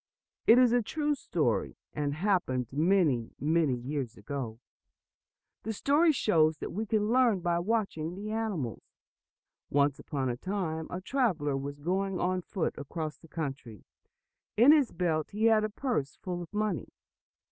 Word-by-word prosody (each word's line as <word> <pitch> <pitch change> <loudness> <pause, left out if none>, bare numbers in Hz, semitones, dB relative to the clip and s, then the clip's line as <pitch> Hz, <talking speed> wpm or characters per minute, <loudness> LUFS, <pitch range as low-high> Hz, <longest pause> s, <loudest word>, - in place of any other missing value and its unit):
It 230 - +8
is 250 -2 +6
a 245 0 +4
true 295 +6 -1
story, 285 - -1 0.2
and 145 -1 -2
happened 165 -9 +1
many, 155 -7 +2
many 155 -2 +2
years 125 -1 -4
ago. 130 -6 -5 1.0
The 220 - -3
story 295 +9 +3
shows 160 - +2
what - - -5
we 215 +4 -3
can 210 0 +1
learn 240 -6 +4
by 170 0 +1
watching 180 -5 -1
the 210 +2 -5
animals. 205 - -2 0.9
Once 140 0 +2
upon 135 -3 -3
a 120 -1 -2
time, 165 -3 -3
a 180 - -5
traveler 185 - 0
was 140 +1 -4
going 185 +5 -1
on 185 0 0
foot 175 -1 -2
across 155 +2 -5
the 165 - -16
country. 140 - -6 0.7
In 245 +6 +8
his 295 -5 +4
belt 160 -4 -1
he 215 +2 0
had 220 -1 +5
a 215 - 0
purse 210 - -2
full 180 -1 -5
of 170 - -9
money. 210 - -1
175 Hz, 155 wpm, -30 LUFS, 145-215 Hz, 1.0 s, It